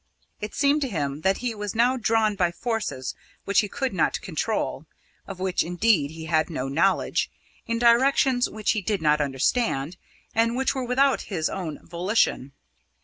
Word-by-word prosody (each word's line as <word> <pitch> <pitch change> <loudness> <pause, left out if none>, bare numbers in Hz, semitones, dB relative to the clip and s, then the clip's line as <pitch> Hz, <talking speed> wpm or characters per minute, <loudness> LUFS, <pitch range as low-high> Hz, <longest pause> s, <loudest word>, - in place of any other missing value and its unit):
It 210 0 -6
seemed 285 +1 +3
to 275 - 0
him 145 -6 -3
that 190 +3 +2
he 240 - 0
was 210 0 -5
now 245 +3 +3
drawn 225 -3 +2
by 180 -3 +1
forces 210 - -3 0.3
which 200 - +3
he 210 - +1
could 265 -1 -2
not 170 - +1
control 160 -5 -3 0.4
of 195 -2 -8
which, 185 -1 0
indeed, 175 -3 +2
he 160 +1 -8
had 160 0 +1
no 135 -5 -3
knowledge 165 +8 +1 0.4
in 230 0 0
directions 245 +2 +4
which 215 -1 -1
he 215 - -1
did 200 -2 -2
not 150 0 +3
understand, 145 - 0 0.4
and 230 +1 +2
which 265 +1 +1
were 260 -2 -3
without 265 +3 +2
his 165 -6 -1
own 170 -6 -6
volition. 175 - 0
200 Hz, 170 wpm, -25 LUFS, 160-235 Hz, 0.4 s, directions